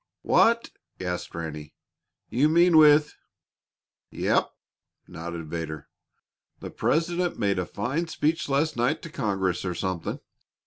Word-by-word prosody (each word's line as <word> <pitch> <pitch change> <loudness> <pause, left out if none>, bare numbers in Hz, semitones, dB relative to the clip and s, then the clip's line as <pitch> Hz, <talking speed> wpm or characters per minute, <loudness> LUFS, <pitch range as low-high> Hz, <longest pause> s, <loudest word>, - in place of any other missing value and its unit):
"What!" 230 0 +3 0.3
gasped 90 -2 -4
Ranny. 75 -2 -6 0.5
"You 140 +6 +2
mean 170 +1 +4
with 150 -1 +6 0.5
" - - -68
"Yep," - - +1 0.6
nodded 85 0 -7
Vedder. 80 -2 -6 0.7
"The - - -8
President 175 +2 0
made 100 -3 0
a 90 - -2
fine 135 +11 -2
speech 160 0 -1
last 145 +3 +1
night 120 +6 0
to 165 - -8
Congress, 95 - -1
or 90 -2 -3
something. 95 -3 -3
120 Hz, 125 wpm, -26 LUFS, -, 0.7 s, with